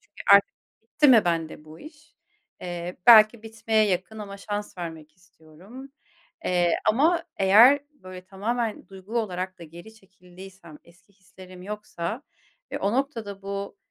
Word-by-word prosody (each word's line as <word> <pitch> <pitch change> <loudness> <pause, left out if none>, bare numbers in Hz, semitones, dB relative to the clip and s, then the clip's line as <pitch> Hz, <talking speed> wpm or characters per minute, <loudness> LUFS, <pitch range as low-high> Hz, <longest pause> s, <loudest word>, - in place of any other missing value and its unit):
çünkü, 205 - -14
artık 200 - +3 0.3
bitti 290 +6 +1
mi, 230 -6 +6
bende 165 -2 -3
bu 155 +1 -14
iş? 310 +1 -16 0.5
Eee, 175 0 -6
belki 220 -1 +7
bitmeye 220 -1 0
yakın, 190 +3 -3
ama 200 -1 -8
şans 205 -1 -6
vermek 160 -3 -8
istiyorum, 185 - -16 0.5
eee, 175 -2 +1 0.2
ama 315 +9 +2
eğer 225 +9 +6
böyle 185 -8 -12
tamamen, 220 +4 -4
duygu 195 +4 -6
olarak 185 -4 -4
da - - -12
geri 175 +7 -14
çekildiysem, 185 -4 -16
eski 175 +4 -24
hislerim 185 -1 -15
yoksa, 210 - -6 0.5
ve - - -3
o 200 +2 -1
noktada, 230 -7 -4
bu, 200 0 -6
195 Hz, 140 wpm, -24 LUFS, 180-220 Hz, 0.5 s, belki